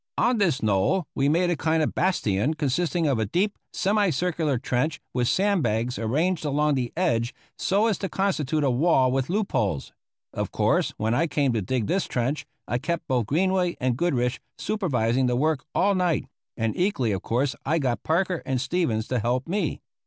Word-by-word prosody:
On 240 -2 +2
this 170 - +1
knoll 110 - +2
we 140 0 +1
made 175 +3 +2
a - - +1
kind 160 +1 +1
of - - -1
bastion 140 - +1
consisting 160 +4 0
of 135 -6 +1
a 110 - 0
deep, 195 - 0 0.2
semi 205 0 +2
circular 160 -3 0
trench 130 +5 -1
with 125 -1 +1
sand 200 +2 +2
bags 115 +1 -1
arranged 155 +10 0
along 150 0 +1
the 125 -3 -1
edge 115 +1 0 0.2
so 200 +3 +1
as 220 -5 +1
to 195 - -3
constitute 155 -6 0
a 135 - +3
wall 130 -1 +3
with 135 +1 -1
loop 205 +2 -1
holes. 90 -10 -1 0.4
Of - - -3
course, - - +1
when 110 +2 0
I 165 +7 +2
came 140 -5 +1
to 110 - 0
dig 115 +4 -1
this 185 - 0
trench, 130 +5 -2 0.2
I 120 - -1
kept 170 +3 -3
both 125 -5 0
Greenway 180 - +1
and 125 -2 +1
Goodrich 125 -6 0 0.2
supervising 130 - 0
the 125 - +1
work 150 +1 0
all 200 +1 +3
night, 180 -5 +1 0.3
and 115 -2 -1
equally 175 - +1
of 95 -2 -2
course 130 +4 0
I 160 +4 +1
got 125 -7 -1
Parker 180 +2 0
and 130 -1 -1
Stevens 135 -6 0
to 125 - 0
help 125 +4 -1
me. 185 -2 -1
145 Hz, 190 wpm, -25 LUFS, 125-175 Hz, 0.4 s, a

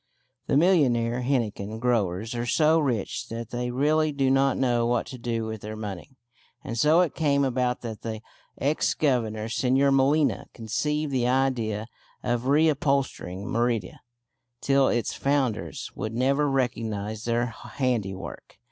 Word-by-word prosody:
The 140 - +3
millionaire 125 -9 +3
henequen 110 -5 -1
growers 110 -3 0
are 120 0 -3
so 160 +4 +4
rich 125 -9 -2
that 115 0 -6
they 125 0 -2
really 150 +5 +2
do 135 -2 +1
not 135 0 +3
know 120 -3 +2
what 120 -1 +1
to 130 - -9
do 115 -1 -2
with 110 -1 -5
their 110 +1 -6
money; 105 +5 -7 0.5
and 130 -6 -5
so 150 +8 +4
it 175 - 0
came 140 -3 +2
about 125 -1 0
that 110 -3 -6
the 110 -1 -5 0.4
ex 145 +3 +1
Governor 110 -7 0
Señor 130 +4 +2
Molina 140 +2 +2
conceived 150 +7 -2
the 125 -2 +1
idea 125 -5 0 0.4
of 120 0 -1
reupholstering 140 - +1
Merida 115 -4 -1 0.6
till 135 0 +3
its 120 -1 0
founders 135 -5 -1
would 110 +2 -5
never 140 +4 +2
recognise 110 -5 -2
their 120 +1 +1
handiwork. 110 - -4
125 Hz, 140 wpm, -26 LUFS, 115-140 Hz, 0.6 s, so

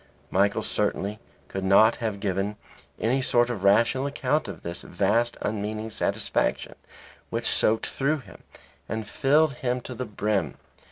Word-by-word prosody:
Michael 100 +1 +2
certainly 105 +2 -1 0.3
could 95 - -4
not 100 +3 +5
have 110 -4 -3
given 100 +1 -1 0.4
any 125 +4 +1
sort 120 -1 +2
of 105 -5 -5
rational 115 +7 +4
account 150 +2 0
of 95 -5 -8
this 85 0 -4
vast 120 +2 +1
unmeaning 110 +1 -3
satisfaction - - 0 0.6
which - - -3
soaked 110 +1 +2
through 145 +3 0
him 105 -10 -14 0.5
and 110 -1 -3
filled 150 +5 +3
him 125 -4 -1
to 125 - -7
the 125 +1 -4
brim. 105 - -1
110 Hz, 145 wpm, -26 LUFS, 100-125 Hz, 0.6 s, not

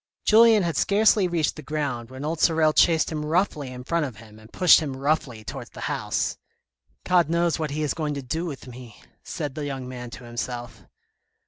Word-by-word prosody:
Julien 220 -1 +6
had 170 -2 -1
scarcely 205 -1 +3
reached 165 -3 -1
the - - -7
ground, 135 -6 -3
when 130 +2 -7
old 160 +1 -2
Sorel 160 -2 +3
chased 165 -1 +3
him 155 -1 -3
roughly 155 -3 0
in 125 0 -8
front 170 +4 0
of 130 -6 -5
him 110 0 -15
and 110 +1 -17
pushed 180 - +6
him 140 -5 -4
roughly 135 -5 -1
towards - - -7
the - - -11
house. - - -2 0.3
" - - -66 0.3
God 175 -3 +3
knows 170 0 +1
what 155 -1 -2
he 150 +2 -2
is 150 - 0
going 150 -3 -3
to 140 - -5
do 165 +7 -3
with 140 -5 -7
me," 125 -3 -12 0.2
said 150 -6 -5
the 145 0 -4
young 135 -2 -5
man 125 -1 -7
to 125 - -10
himself. 120 -3 -6
150 Hz, 210 wpm, -24 LUFS, 125-165 Hz, 0.3 s, Julien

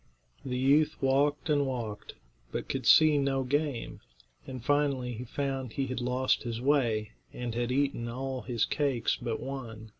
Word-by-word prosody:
The 125 -1 -3
youth 145 +4 +3
walked 140 +4 +2
and 145 -3 +2
walked, 115 -5 -5 0.4
but - - -4
could 130 -4 -3
see 155 -2 +7
no 135 -1 +1
game, 145 -2 -2 0.5
and 130 -2 -7
finally 140 -4 +1
he 120 +3 -6
found 135 0 -3
that - - -15
he 135 - 0
had 130 -1 -4
lost 125 +1 +1
his 115 -2 -4
way, 120 -6 +1 0.2
and 120 -2 -4
had 120 +1 -1
eaten 135 -3 0
all 130 +2 -4
his 115 -4 0
cakes 135 -1 0
but 120 -2 -3
one. 115 -5 -7
130 Hz, 170 wpm, -30 LUFS, 120-140 Hz, 0.5 s, see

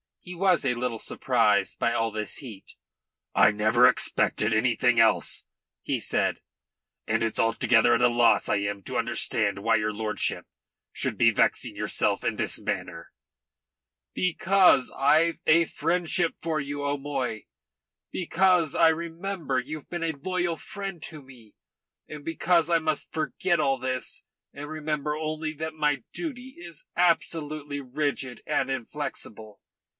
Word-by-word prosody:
He 180 - -9
was 180 -3 +2
a 125 -2 +1
little 120 -2 -3
surprised 105 -7 +1
by 115 - +1
all 115 0 0
this 105 0 -3
heat. 115 -9 -11 0.6
"I 105 - +6
never 110 +4 +4
expected 110 -3 +2
anything 120 +1 +2
else," 115 -1 +2 0.4
he - - -2
said. - - 0 0.7
"And - - +1
it's 115 - -2
altogether 115 +1 +3
at 115 - 0
a - - +7
loss 120 -1 +3
I - - +1
am 100 -1 -3
to - - -4
understand - - +1
why 115 +3 +2
your 105 0 0
lordship 105 -1 -2 0.5
should - - -3
be - - +5
vexing - - +1
yourself - - 0
in - - -1
this - - 0
manner." - - -5 1.0
"Because 185 -5 +3
I've 155 +4 +2
a 165 +1 +5
friendship 170 +2 0
for 160 -2 -1
you, 145 +1 -4
O'Moy. 140 -5 -3 0.7
Because 180 -2 +2
I 165 - +6
remember 165 -3 -2
that 125 - -17
you've 155 -1 -7
been 175 -1 -4
a 165 - 0
loyal 175 +3 -2
friend 195 -1 -6
to 155 -2 -8
me. 120 -5 -16 0.5
And 150 -1 -9
because 165 +1 +1
I 170 - +4
must 160 -2 -2
forget 160 +3 0
all 135 -1 +1
this 130 0 -1 0.3
and 145 +1 -8
remember 150 -1 -3
only 155 0 -3
that 160 +1 -5
my 150 -4 0
duty 260 -6 -6
is 170 -3 -8
absolutely 155 -4 0
rigid 135 -2 -3
and - - 0
inflexible. 115 -5 -5
145 Hz, 145 wpm, -26 LUFS, 120-165 Hz, 1.0 s, a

